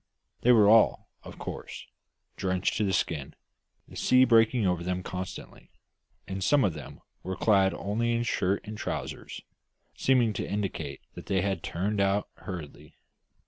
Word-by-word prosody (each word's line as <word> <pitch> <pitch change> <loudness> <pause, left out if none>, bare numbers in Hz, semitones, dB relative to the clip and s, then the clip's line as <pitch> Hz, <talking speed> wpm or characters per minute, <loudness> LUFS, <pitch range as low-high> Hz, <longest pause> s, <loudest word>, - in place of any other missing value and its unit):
They 125 - +5
were 110 -4 +6
all, 110 +1 +4
of - - -11
course, - - -7 0.5
drenched 95 0 -1
to 110 - +1
the 100 - +1
skin, 75 -7 -2 0.5
the - - -14
sea 130 0 +4
breaking 115 -1 +4
over 90 -2 0
them 90 +1 -2
constantly; 90 +1 -7 0.6
and 95 0 -4
some 140 +9 +4
of 95 -5 +1
them - - -10 0.2
were 95 +1 -4
clad 95 -1 +3
only 115 +4 -1
in 115 0 0
shirt 100 -6 0
and 110 +1 -7
trousers, - - -5 0.5
seeming 125 -4 +2
to - - -4
indicate 85 -9 -3
that - - -10
they 95 -2 +1
had 95 -3 -1
turned 100 +5 -2
out 100 +1 +1
hurriedly. 85 -7 -9
100 Hz, 155 wpm, -28 LUFS, 90-110 Hz, 0.6 s, were